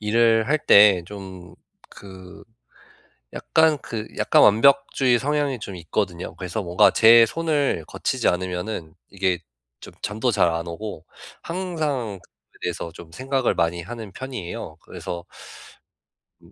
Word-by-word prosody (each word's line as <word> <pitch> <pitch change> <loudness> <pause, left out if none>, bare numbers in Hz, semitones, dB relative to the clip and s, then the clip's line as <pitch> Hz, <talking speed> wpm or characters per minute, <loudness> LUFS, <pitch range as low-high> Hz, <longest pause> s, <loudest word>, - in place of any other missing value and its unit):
일을 115 +1 +2
할 155 +1 +2
때 100 -3 +7
좀 95 -3 -10 0.4
그 95 -2 -13 0.9
약간 160 -2 +2
그 110 -2 -5
약간 - - +3
완벽주의 130 +2 +4
성향이 145 -1 -1
좀 100 -3 -8
있거든요. 90 +1 -4
그래서 95 +4 -4
뭔가 90 -1 +4
제 115 +1 +7
손을 145 - -1
거치지 - - -1
않으면은 90 -2 -3 0.2
이게 95 -2 0 0.4
좀 - - -12
잠도 110 +5 -1
잘 100 -6 +3
안 85 +1 -3
오고 85 -1 -7 0.4
항상 155 - -3
그거에 - - -28
대해서 85 -1 -4
좀 85 0 -13
생각을 130 +7 -1
많이 85 +1 -1
하는 110 +2 -8
편이에요. 125 -9 -7
그래서 85 0 -7 1.2
음. 85 +1 -20
105 Hz, 260 characters per minute, -23 LUFS, 90-130 Hz, 1.2 s, 때